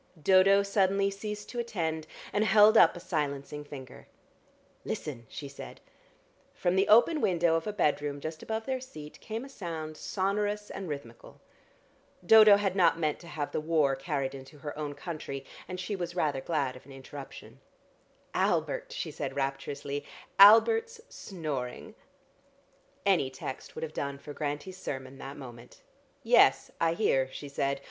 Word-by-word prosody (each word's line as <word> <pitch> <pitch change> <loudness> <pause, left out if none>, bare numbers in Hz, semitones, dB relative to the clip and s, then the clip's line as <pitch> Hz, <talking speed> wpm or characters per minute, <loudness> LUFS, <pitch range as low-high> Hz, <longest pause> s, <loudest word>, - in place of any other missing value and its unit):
Dodo 190 +4 +5
suddenly 195 0 +2
ceased 210 +1 -6
to 240 - -5
attend, 160 -9 -2 0.3
and 205 - +2
held 215 +1 +6
up 170 -6 +7
a - - -7
silencing 150 -4 -3
finger. 135 -3 -11 0.8
"Listen!" 120 -6 -5
she 145 - -7
said. 140 - -10 0.8
From 175 +1 0
the 190 +1 +3
open 280 +8 +5
window 170 -3 +2
of 165 +3 0
a - - 0
bedroom 145 -7 0
just 155 +2 -6
above 220 0 -4
their 260 -1 -2
seat 155 - -10
came 225 +3 -5
a - - -9
sound 165 - -6
sonorous 205 +4 -2
and 190 -3 -6
rhythmical. 140 -6 -8 0.9
Dodo 215 +1 +8
had 195 -2 -1
not 175 -3 +4
meant 155 -3 -1
to 170 - -13
have 150 -3 -4
the - - -2
war 155 -4 +2
carried 135 -1 -3
into 135 +2 -11
her 145 0 -7
own 145 -1 -4
country, 140 -6 -6 0.2
and 185 0 -6
she 200 +3 -3
was 175 -2 -5
rather 145 -6 0
glad 140 -6 -1
of 130 +1 -14
an - - -13
interruption. 135 +1 -10 0.7
"Albert!" - - 0
she - - -4
said - - -5
rapturously. 140 +1 -3 0.4
"Albert 340 - +8 0.2
snoring." 150 - -5 1.1
Any 180 -9 +3
text 130 0 -8
would - - -5
have 155 -1 -5
done 140 0 -3
for 145 +1 -9
Grantie's 150 +6 -4
sermon 130 -4 -6
that 135 +1 -8
moment. 120 -4 -12 0.4
"Yes, - - +5
I 165 0 +3
hear," 135 -10 +1
she 145 - -8
said. 140 0 -1
160 Hz, 155 wpm, -29 LUFS, 140-200 Hz, 1.1 s, Dodo